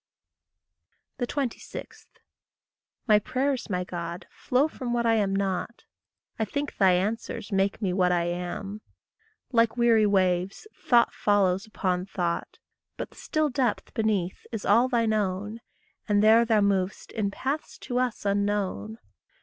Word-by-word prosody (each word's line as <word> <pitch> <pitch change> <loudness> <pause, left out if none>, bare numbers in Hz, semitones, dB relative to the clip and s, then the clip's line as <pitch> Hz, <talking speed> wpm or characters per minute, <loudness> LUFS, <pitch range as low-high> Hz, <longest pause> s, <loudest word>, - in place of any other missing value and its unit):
26. 255 -1 -5 1.0
My 210 -2 +6
prayers, 260 +3 -1
my 180 -2 -1
God, 170 -1 -6
flow 260 +4 +1
from 255 -6 -5
what 235 0 0
I 230 - +4
am 200 -3 +1
not; 195 +3 -2 0.6
I - - +2
think 285 +7 -4
thy 190 -2 +5
answers 215 +3 -2
make 195 +2 0
me 185 -2 +1
what 180 -1 +2
I 175 -1 +2
am. 180 +4 -4 0.7
Like 230 -1 +3
weary 230 -3 +4
waves 185 - +1
thought 250 -11 +3
follows 200 -1 +2
upon 185 -3 -1
thought, 175 -3 -3 0.4
But - - -5
the - - -19
still 310 -1 0
depth 250 -4 -1
beneath 205 -5 -1
is 225 -3 -4
all 230 +5 +5
thine 230 -3 +2
own, 205 +2 -2 0.5
And 205 0 +3
there 225 +2 +6
thou 220 -2 +3
mov'st 195 -1 0
in 210 -2 -1
paths 275 +9 -4
to 250 -1 -1
us 250 -4 -2
unknown. 200 - -1
210 Hz, 140 wpm, -27 LUFS, 185-235 Hz, 1.0 s, My